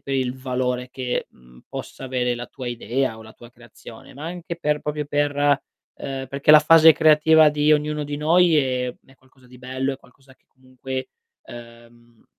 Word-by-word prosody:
per 135 - -5
il 130 -1 -1
valore 125 -1 -3
che, 125 -1 -4
mhmm, 60 0 -21
possa - - -8
avere 125 -1 -1
la 120 0 -7
tua 125 +1 -8
idea 120 0 -3
o - - -12
la 110 0 -14
tua 120 +1 -16
creazione, 120 -1 -15
ma 145 +3 -9
anche 170 0 -6
per 150 -3 -1
proprio 150 0 -4
per 145 0 -1 0.6
ehm, 135 -1 -6
perché 140 +2 +1
la 155 - +9
fase 160 +1 +7
creativa 155 0 +5
di 150 +1 +2
ognuno 150 0 0
di 145 0 -5
noi 165 +2 +3
è 125 -3 -1
è 135 - -22
qualcosa 130 -1 -25
di 125 0 -16
bello, 130 +2 -3
è - - -12
qualcosa 135 +1 -22
che - - -44
comunque, 130 0 -8 0.4
uhm, 120 0 -15
130 Hz, 185 wpm, -22 LUFS, 125-150 Hz, 0.6 s, la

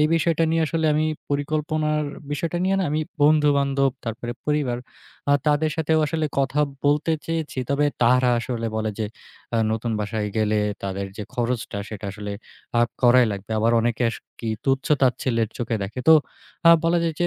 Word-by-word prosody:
এই 150 - +5
বিষয়টা 165 0 +2
নিয়ে 165 0 +2
আসলে 160 +1 0
আমি 155 +1 +2 0.2
পরিকল্পনার 150 +1 0 0.3
বিষয়টা 165 +4 -2
নিয়ে 190 +1 +2
না 190 - +1
আমি 155 +1 0 0.2
বন্ধু-বান্ধব, 140 -3 +3
তারপরে 120 +1 -4
পরিবার 145 -5 0 0.5
আ - - +6
তাদের 150 +1 +2
সাথেও 160 0 +2
আসলে 160 0 -1
কথা 140 +2 +1 0.2
বলতে 150 +3 +2
চেয়েছি। 160 -4 -3
তবে 145 +1 +2 0.2
তারা 125 +1 +4
আসলে 115 -1 -3
বলে 110 0 -1
যে, 110 - -1 0.5
আ - - +3 0.2
নতুন 115 +1 -2
বাসায় 105 0 -2
গেলে 105 0 +2 0.2
তাদের 100 0 -3
যে 105 - -4
খরচটা 120 -3 -2
সেটা 105 -1 -7
আসলে 105 -1 -6 0.5
আ - - +5 0.2
করাই 125 0 +6
লাগবে। 100 +2 -8
আবার 115 +2 +2
অনেকে 120 +1 0
আস - - -6 0.2
কি 115 - -3 0.2
তুচ্ছ 135 0 +1 0.2
তাচ্ছিল্যের 120 -3 +1
চোখে 120 -1 -1
দেখে। 110 +6 -5
তো 160 - +10 0.5
আ - - +11
বলা 170 +1 +3
যায় 165 -1 -1
যে 175 - +3
135 Hz, 175 wpm, -23 LUFS, 115-155 Hz, 0.5 s, আ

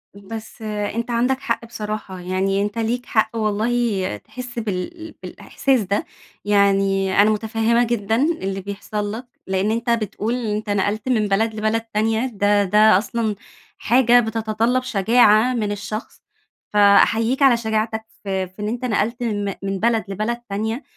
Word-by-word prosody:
بس 220 +3 -9
أنت 215 +2 -3
عندك 250 +3 +1
حق 230 -3 -2
بصراحة، 210 -4 -6
يعني 190 +2 0
أنت 205 +2 -3
ليك 235 +2 -1
حق 220 0 +1
والله 215 - 0
تحس 250 - -8
بال 225 - -5
بالإحساس 265 -4 -1
ده، 200 +1 -1 0.4
يعني 195 -1 +3
أنا 210 - +5
مُتفهمة 225 +2 +1
جدًا 225 -2 0
اللي 210 - -1
بيحصل 205 +1 -4
لك، 230 +4 -6 0.2
لإن 190 +2 0
أنت 230 +2 -2
بتقول 225 0 -1
أنت 210 0 -3
نقلت 205 +4 -1
من 220 -4 +2
بلد 220 +3 +1
لبلد 220 +1 0
تانية، 225 +1 0
ده 205 -3 +2
ده 210 +1 +5
أصلًا 220 +1 -2 0.4
حاجة 245 +1 +4
بتتطلّب 225 +2 0
شجاعة 225 +1 +4
من 215 -4 -1
الشخص، 205 +2 -6 0.5
فأحيّيك 225 +5 +4
على 265 -4 +6
شجاعتك 220 -1 -2 0.2
في 190 -1 -2
في 185 +3 -13
إن 210 - -2
أنت 240 +3 -3
نقلت 235 +1 -1
من 205 -3 -1 0.2
من 195 0 -2
بلد 225 +1 +2
لبلد 215 +5 -2
تانية، 220 +6 -2
215 Hz, 145 wpm, -21 LUFS, 205-235 Hz, 0.5 s, على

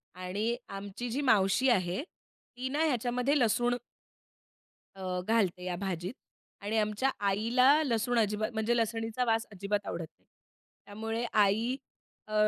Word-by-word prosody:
आणि 200 +6 -2 0.2
आमची 205 +5 -6
जी 265 +5 -1
मावशी 205 +4 +4
आहे, 185 +2 +1
ती 260 -7 -10
ना 295 +4 +1
ह्याच्यामध्ये 250 +1 +1
लसूण 240 +1 +2 1.2
अ, 185 -1 -3
घालते 200 -6 +1
या 180 -1 -2
भाजीत 180 0 -3 0.5
आणि 210 +2 -1
आमच्या 215 +5 +1 0.2
आईला 230 +6 +3 0.2
लसूण 240 -2 +1
अजिबात 215 +1 0
म्हणजे 220 +2 +1
लसणीचा 225 +1 -1
वास 225 -1 +1
अजिबात 200 +1 -2
आवडत 170 -1 -3
नाही. - - -37 0.6
त्यामुळे 225 +3 -3 0.2
आई 225 +6 +1 0.5
अ, 215 - -8
220 Hz, 130 wpm, -30 LUFS, 200-240 Hz, 1.2 s, मावशी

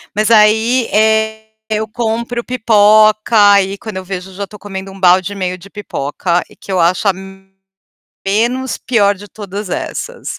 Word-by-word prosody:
mas 215 +2 +1
aí, 225 +3 +4
eh, 220 0 +1 0.2
eu 215 0 -1
compro 235 +1 -3
pipoca, 215 -2 +3 0.2
aí 200 0 +2
quando 215 -3 -7
eu 185 - -6
vejo 190 0 -6
eu - - -14
já 200 0 -4
estou 210 +2 -13
comendo 195 -1 -7
1 195 - -12
balde 185 +1 +3
e - - -9
meio 185 -1 -3
de 195 +3 -15
pipoca, 175 -3 -2 0.2
que 195 - -8
eu 185 - 0
acho 180 +4 +2
a, - - +2 1.1
menos 240 +6 0
pior 205 -5 +2
de 205 +2 -12
todas 200 -1 -7
essas. - - -5
210 Hz, 170 wpm, -15 LUFS, 190-220 Hz, 1.1 s, aí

